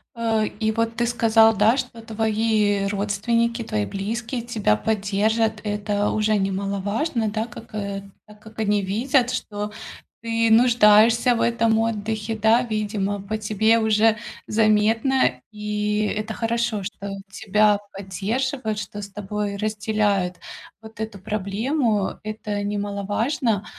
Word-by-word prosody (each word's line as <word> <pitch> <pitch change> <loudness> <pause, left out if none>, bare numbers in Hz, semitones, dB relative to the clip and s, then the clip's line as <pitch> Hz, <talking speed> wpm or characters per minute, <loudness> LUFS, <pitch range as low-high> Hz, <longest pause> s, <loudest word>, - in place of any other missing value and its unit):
Э, 225 -2 +1
и 220 0 +1
вот 230 +1 -1
ты 235 0 +1
сказал, 225 -1 +4
да, 215 +5 +4
что 250 -3 -5
твои 215 -2 +1
родственники, 225 +4 0
твои 105 - -1
близкие 230 - -4
тебя 225 - +1
поддержат. 215 - 0
Это 205 -1 -1
уже 215 0 +1
немаловажно, 200 - -1
да, 220 +2 -2
как, 230 -1 -12
э, 200 -1 -4 0.2
да 210 - -14
как 220 +1 -14
они 210 -1 +2
видят, 245 +6 +1
что 210 -4 -4 0.5
ты 230 0 +1
нуждаешься 230 0 +5
в - - -1
этом 230 -1 +2
отдыхе. 220 0 -2
Да, 220 +3 +4
видимо, 210 -3 -2
по 215 +2 -3
тебе 220 +2 +2
уже 220 0 +3 0.3
заметно, 215 - +2
и 210 0 -1
это 215 +1 -4
хорошо, 230 -2 -1
что 200 +1 -6 0.2
тебя 210 -1 +2
поддерживают, 215 +5 -3
что 205 0 -6
с 200 - -7
тобой 205 0 -4
разделяют 210 -3 0 0.4
вот 220 0 -14
эту 220 -2 -4
проблему. 210 +3 -1
Это 215 -1 -4
немаловажно, 205 +3 -1
215 Hz, 125 wpm, -23 LUFS, 205-230 Hz, 0.5 s, нуждаешься